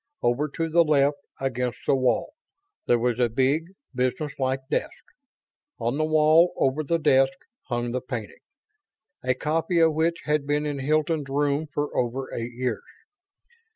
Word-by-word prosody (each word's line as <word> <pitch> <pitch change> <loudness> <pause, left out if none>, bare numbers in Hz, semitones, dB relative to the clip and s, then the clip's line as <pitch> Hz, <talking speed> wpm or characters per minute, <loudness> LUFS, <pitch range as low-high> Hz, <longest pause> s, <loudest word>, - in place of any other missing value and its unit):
Over 130 +6 +1
to 165 - -1
the 170 +1 +4
left, 145 -2 +2 0.2
against 125 -2 -2
the - - +3
wall, 130 - +1 0.5
there 120 - +4
was 120 0 0
a 120 -1 +3
big, 135 +7 +1 0.3
business 135 +4 -1
like 130 0 0
desk. - - -3 0.7
On 120 +6 -1
the 155 - +2
wall, 155 +2 +4
over 135 +3 +1
the 170 +3 +1
desk, 135 -3 +3 0.3
hung 120 -1 -2
the 125 +1 -2
painting; 120 -5 -6 0.8
a 130 0 +1
copy 165 +5 -1
of 165 -1 +5
which 165 +2 0
had 150 -2 0
been 145 +1 0
in 145 -2 -3
Hilton's 155 +1 0
room 145 +2 0
for 145 0 -3
over 125 +2 -2
eight 115 +1 -4
years. 125 -2 -2
140 Hz, 155 wpm, -25 LUFS, 125-155 Hz, 0.8 s, of